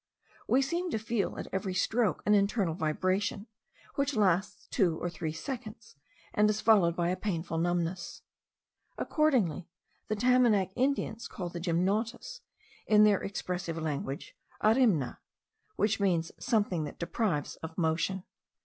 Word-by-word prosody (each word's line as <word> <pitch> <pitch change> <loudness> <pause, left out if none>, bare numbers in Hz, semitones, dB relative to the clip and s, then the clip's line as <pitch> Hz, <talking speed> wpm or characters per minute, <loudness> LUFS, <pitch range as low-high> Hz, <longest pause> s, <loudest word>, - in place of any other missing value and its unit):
We 265 +2 +4
seem 345 +6 -1
to 265 - -1
feel, 220 -1 -2
at - - -4
every 190 -1 -2
stroke, 220 +2 +1
an 210 - +4
internal 200 -3 +2
vibration, 185 +6 -1 0.5
which 280 0 0
lasts 195 -3 +1
two 175 -8 +2
or 175 - -3
three 160 -2 -4
seconds, 220 - -7 0.4
and 210 0 +4
is 210 0 0
followed 195 -8 +4
by 175 -1 0
a 180 - +1
painful 170 -4 -2
numbness. 175 +1 -2 0.7
Accordingly, 235 - +1 0.4
the 215 - 0
Tamanac 225 -5 +3
Indians 255 -4 0
call 180 -2 -5
the 170 - -6
gymnotus, 205 - -1 0.5
in 210 -1 +6
their 210 -2 +4
expressive 180 -4 -4
language, 150 -2 -4 0.3
arimna, 215 - +3 0.6
which 215 +1 +1
means 175 -5 +1
something 205 -9 +1
that 145 - -8
deprives 170 - -1
of 160 0 -8
motion. 175 +3 0
195 Hz, 135 wpm, -30 LUFS, 170-220 Hz, 0.7 s, in